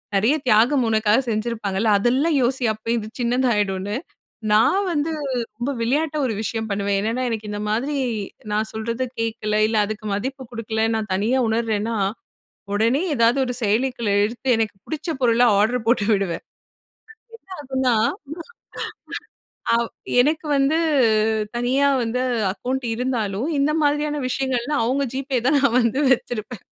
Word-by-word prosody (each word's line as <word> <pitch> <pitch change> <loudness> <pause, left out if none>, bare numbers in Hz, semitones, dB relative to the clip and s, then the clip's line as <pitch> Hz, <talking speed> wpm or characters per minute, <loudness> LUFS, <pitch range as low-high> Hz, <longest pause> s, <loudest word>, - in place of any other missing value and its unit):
நெறைய 220 +9 +3
தியாகம் 240 +4 +4
உனக்காக 220 +1 +3
செஞ்சிருப்பாங்கல்ல. 215 -2 -1
அதெல்லாம் 270 +8 +2
யோசி." 250 +1 +1
அப்ப 215 - -26
இது 215 -2 -4
சின்னதாயிடுன்னு. 210 -5 0 0.6
நான் 225 - +4
வந்து, 310 0 0 0.5
ரொம்ப 240 +4 -2
விளையாட்டா 300 +6 0
ஒரு 235 - -1
விஷயம் 220 +1 -3
பண்ணுவேன். 200 0 0
என்னென்னா, 230 +4 -1
எனக்கு 220 -2 -4
இந்த 205 - -4
மாதிரி, 255 +8 -1 0.6
நான் 215 +1 0
சொல்றத 230 +3 -2 0.2
கேட்கல. 225 -2 -1
இல்ல, 220 0 0
அதுக்கு 215 +1 -6
மதிப்பு 265 +6 -4
குடுக்கல. 225 -1 -3
நான் 215 -3 -3
தனியா 215 +7 +1
உணர்றேன்னா, 225 0 0 0.8
உடனே 225 +6 +2 0.2
ஏதாவது 235 +1 +3
ஒரு 250 - -3
செயலிக்குள்ள 235 +1 0
எடுத்து, 235 +4 -6
எனக்கு 220 -2 -1
புடிச்ச 315 +1 -5
பொருள 235 -1 +3 0.2
ஆர்டர் 225 +2 +1
போட்டு 230 -3 +3
விடுவேன். 195 -5 0 1.2
அப்ப 270 -2 -13
என்ன 260 -1 +2 0.2
ஆகும்னா, 310 - -4 1.4
ஆ - - +5
வ் - - -15 0.3
எனக்கு 305 +4 +1
வந்து 275 +3 +2 0.8
தனியா 260 +4 +2
வந்து 235 +2 -1 0.3
அக்கவுண்ட் 250 +5 -3
இருந்தாலும், 230 -1 -1
இந்த 280 +2 +2
மாதிரியான 295 0 +1
விஷயங்கள்லாம், 265 +1 -1
அவுங்க 270 +4 0
GPay 265 -1 -1
தான் 285 +2 +4
நான் 265 -3 +2
வந்து 235 +3 +1
வச்சிருப்பேன். 240 -1 -6
235 Hz, 135 wpm, -22 LUFS, 215-265 Hz, 1.4 s, ஆ